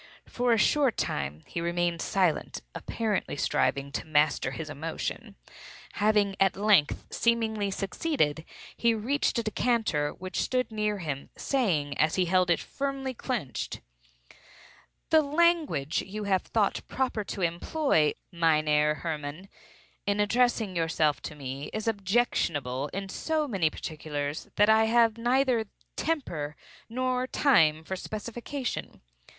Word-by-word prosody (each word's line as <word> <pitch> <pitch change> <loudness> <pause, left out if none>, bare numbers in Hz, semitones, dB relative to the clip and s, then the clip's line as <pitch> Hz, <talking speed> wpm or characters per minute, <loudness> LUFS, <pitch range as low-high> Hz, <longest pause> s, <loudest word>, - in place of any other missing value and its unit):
For 245 0 0
a 230 - +5
short 265 +2 +3
time 70 +2 -2
he 170 - -4
remained 170 0 0
silent, 180 -6 0
apparently 220 -8 -2
striving 140 0 0
to 145 - -4
master 150 -4 +2
his 155 +4 -6
emotion. 155 +2 -5 0.6
Having 205 -2 +2
at 195 -1 +3
length 200 -7 +3
seemingly 220 -3 +1
succeeded, 195 - -1 0.3
he 235 -1 +2
reached 255 +6 0
a 235 - +1
decanter 215 -9 +1
which 185 +4 -4
stood 255 -2 0
near 210 -1 0
him, 150 -7 -5
saying 165 - 0
as 155 +1 +3
he 185 - +2
held 185 0 +2
it 170 - +3
firmly 275 -1 -3
clenched—"The - - -4
language 305 - +2
you 210 +2 -6
have 190 -2 +2
thought 210 -3 0
proper 255 -5 -1
to 195 - -4
employ, 170 - +2 0.2
Mynheer 155 -3 +3
Hermann, 155 +3 -4 0.6
in 200 0 +1
addressing 220 -2 +2
yourself 160 -3 +1
to 150 - -6
me, 135 0 -6
is 215 +1 -3
objectionable 185 - 0
in 195 +6 -5
so 310 +9 -1
many 190 - +1
particulars, 150 -2 -5
that 205 - +5
I 220 0 +5
have 230 0 +3
neither 245 -2 +2 0.3
temper 170 - -2 0.3
nor 255 +1 -1
time 160 - +4
for 190 - -4
specification. 235 +7 -5
195 Hz, 125 wpm, -28 LUFS, 155-235 Hz, 0.6 s, a